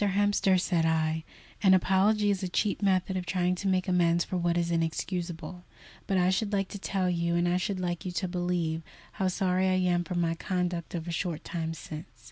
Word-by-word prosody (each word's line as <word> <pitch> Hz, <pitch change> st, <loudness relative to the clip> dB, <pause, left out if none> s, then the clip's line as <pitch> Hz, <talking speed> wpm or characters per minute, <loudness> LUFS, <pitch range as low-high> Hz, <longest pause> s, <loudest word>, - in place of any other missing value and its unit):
Hemster," 200 Hz, -1 st, +3 dB
said 175 Hz, -2 st, +1 dB
I, 160 Hz, 0 st, +1 dB, 0.4 s
"an 190 Hz, -3 st, +6 dB
apology 205 Hz, +3 st, +3 dB
is 195 Hz, -1 st, -1 dB
a 185 Hz, -, -2 dB
cheap 200 Hz, +4 st, 0 dB
method 190 Hz, -1 st, +1 dB
of 180 Hz, -2 st, -3 dB
trying 180 Hz, 0 st, +1 dB
to 190 Hz, +2 st, -3 dB
make 185 Hz, -1 st, +1 dB
amends 175 Hz, -2 st, +3 dB
for -, -, -4 dB
what 175 Hz, -1 st, +1 dB
is 170 Hz, 0 st, 0 dB
inexcusable; 170 Hz, +1 st, -3 dB, 0.4 s
but 195 Hz, -, +1 dB
I 180 Hz, 0 st, +3 dB
should 200 Hz, +2 st, 0 dB
like 195 Hz, -2 st, 0 dB
to 200 Hz, -, -7 dB
tell 190 Hz, -1 st, -1 dB
you, 170 Hz, -1 st, 0 dB
and 175 Hz, 0 st, +2 dB
I 175 Hz, +1 st, +2 dB
should 185 Hz, +1 st, -2 dB
like 175 Hz, -2 st, -2 dB
you 185 Hz, -, -3 dB
to 185 Hz, +1 st, -1 dB
believe, 175 Hz, -2 st, -1 dB, 0.3 s
how 190 Hz, -2 st, -1 dB
sorry 185 Hz, 0 st, +1 dB
I -, -, +2 dB
am 180 Hz, -1 st, +2 dB
for 180 Hz, +1 st, -5 dB
my 170 Hz, -1 st, +1 dB
conduct 175 Hz, 0 st, -2 dB
of 165 Hz, 0 st, -4 dB
a -, -, -2 dB
short 170 Hz, -2 st, -3 dB
time 165 Hz, -1 st, -3 dB
since. 155 Hz, 0 st, -8 dB
180 Hz, 215 wpm, -29 LUFS, 170-190 Hz, 0.4 s, an